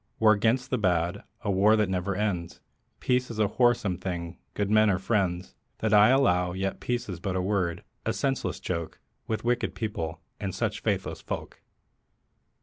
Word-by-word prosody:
War 110 -1 +6
'gainst 120 +5 +1
the 130 - +1
bad, 90 -1 +1 0.2
a 100 - -1
war 100 +3 +5
that 105 -2 +2
never 95 +1 -1
ends; 90 -5 -2 0.4
Peace 125 0 +1
is 115 - -6
a 105 -1 +3
wholesome 120 -6 +2
thing, 85 -2 -5 0.2
good 105 0 -1
men 110 0 +5
are 95 - +2
friends. 95 -3 -1 0.2
That 110 -1 0
I 105 +2 +7
allow; 90 -10 +3
yet 95 +1 -2
peace 120 -1 -2
is 90 -4 -5
but 95 +1 -3
a - - +1
word, 90 -4 0 0.2
a - - 0
senseless 135 -1 -1
joke, 85 -3 -4 0.3
With 110 +1 -2
wicked 120 0 0
people, 85 -7 -3 0.2
and 100 -3 -3
such - - -1
faithless - - -1
folk. - - -6
100 Hz, 175 wpm, -27 LUFS, 90-110 Hz, 0.4 s, I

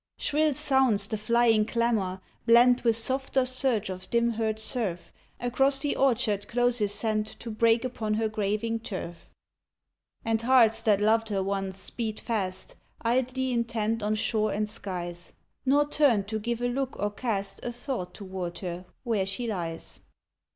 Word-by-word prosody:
Shrill 300 -1 +1
sounds 260 -8 +3
the 215 - -3
flying 225 0 +3
clamor, 215 -5 0 0.3
blent 245 +2 +6
With 230 -2 +4
softer 265 +3 +1
surge 255 -6 +1
of 185 0 -8
dim 235 0 +2
heard 220 -1 -1
surf. 215 -5 -2 0.3
Across 270 +3 +2
the 290 - 0
orchard 230 -6 +1
closes 240 -3 +1
sent 215 0 -1
To 230 +1 -7
break 230 +2 +3
upon 220 -4 -2
her 220 0 +1
graving 215 +1 -1
turf. 185 -6 -7 1.0
And 225 0 +1
hearts 235 -2 +4
that 205 -2 +3
loved 225 +1 +3
her 195 -2 0
once 195 -1 -2
speed 220 +1 -4
fast, 190 -5 -3 0.3
Idly 255 +2 0
intent 230 -1 -1
on 210 +1 0
shore 215 0 0
and 210 +1 -1
skies, 175 -4 -5 0.3
Nor 290 +2 +4
turn 280 -9 +3
to 220 +2 -3
give 235 +2 -3
a - - +2
look 265 +1 -2
or 205 +1 -1
cast 205 -3 -3
A 240 - -3
thought 240 -7 -5
toward 185 -3 -5
her 180 -1 -5 0.2
where 220 -6 0
she 195 +5 -3
lies 170 -7 -4
225 Hz, 155 wpm, -28 LUFS, 205-245 Hz, 1.0 s, blent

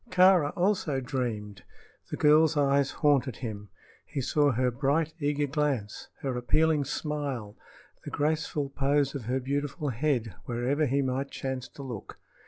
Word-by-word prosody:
Kāra 185 -5 +5
also 175 -7 +1
dreamed. 110 -7 -3 0.5
The - - -4
girl's 155 +1 +5
eyes 140 -1 +3
haunted 140 -5 +2
him. 105 -4 -6 0.3
He 145 - -5
saw 145 +2 +2
her 125 +1 +1
bright, 145 +5 0
eager 145 0 +1
glance, 140 -7 -2
her 135 -2 -2
appealing 150 +4 +2
smile, 140 -8 -3 0.5
the - - -6
graceful 150 -1 -1
pose 140 0 +1
of 135 -6 -5
her 130 +3 0
beautiful 140 +2 -2
head 120 - 0
wherever 125 +5 0
he 140 +2 +1
might 135 +1 -1
chance 130 -1 -4
to 140 - -11
look. 120 -7 -7
140 Hz, 145 wpm, -28 LUFS, 125-150 Hz, 0.5 s, Kāra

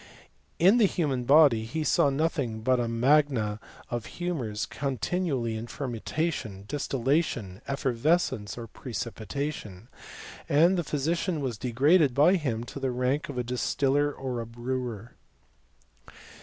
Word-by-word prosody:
^ - - -18 0.5
In 190 +8 +5
the 215 - +6
human 140 -9 -1
body 140 -5 +6
he 140 +8 -3
saw 145 0 +3
nothing 140 -6 -1
but 130 +2 +2
a 120 - 0
magna 115 -3 +2 0.3
of 120 -2 -3
'j - - -9
humours 140 -12 -3
continually 135 - -2
in 110 +2 -5
fermentation, 120 - -3
distillation, 135 - -1
effer 135 -1 -1
vescence, 120 -6 0
or 120 - -6
precipitation; 115 -1 -5 0.6
and 165 +6 +5
the 175 - 0
physician 160 +4 -1
was 125 -7 -3
de 125 - -3
graded 145 +2 +4
by 150 +6 +6
him 130 -11 -1
to 120 - -8
the 135 -1 -1
rank 130 +4 -1
of 140 - -6
a 125 - 0
distiller 135 +4 +1
or 130 -4 -4
a 115 - -7
brewer. 120 -1 -4
130 Hz, 145 wpm, -28 LUFS, 115-150 Hz, 0.6 s, the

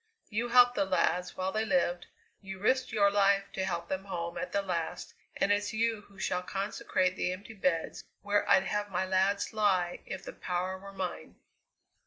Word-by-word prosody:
You 230 +3 0
helped 245 0 +7
the 195 - +1
lads 180 -1 0
while 185 0 -1
they 220 +2 0
lived; 180 -4 +1 0.3
you 195 -1 -7
risked 255 +7 +1
your 200 -2 +4
life 200 0 +3
to 190 - -2
help 170 -2 -2
them 190 +1 -3
home 170 -3 -4
at 180 - -4
the 200 - 0
last; 170 -4 -3 0.2
and 200 - +2
it's 205 +1 +1
you 225 -1 0
who 200 - -19
shall 180 -1 -1
consecrate 185 -1 -1
the 180 - -1
empty 200 +4 -8
beds 185 -5 -1 0.2
where 205 0 +1
I'd 190 - +6
have 205 +1 -2
my 190 0 -1
lads 190 +3 +1
lie 190 -5 +1
if 190 - -6
the - - -7
power 185 +1 -3
were 195 +1 -10
mine!" 185 -2 -5
195 Hz, 190 wpm, -30 LUFS, 185-205 Hz, 0.3 s, helped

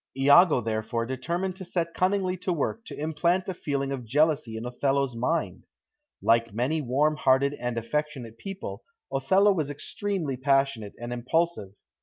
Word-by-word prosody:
Iago 145 +1 +6
therefore 110 +1 -2
determined 170 +9 -3
to 190 - -7
set 170 -2 -2
cunningly 185 0 +1
to 185 +1 -2
work 175 +7 -2
to - - -8
implant 165 +4 0
a 190 - -2
feeling 140 -4 -2
of 135 -3 -4
jealousy 140 -1 +1
in 115 - -5
Othello's 135 +1 0
mind. 130 +9 -2 0.6
Like 115 0 +3
many 135 +7 0
warm 145 +4 +1
hearted 135 0 +3
and 125 -3 -4
affectionate 120 -2 -3
people, 195 +5 -7 0.3
Othello 190 +10 +4
was 155 -6 -2
extremely 155 -1 -3
passionate 135 -5 +1
and 120 +1 -5
impulsive. 125 - -1
140 Hz, 150 wpm, -27 LUFS, 125-170 Hz, 0.6 s, Iago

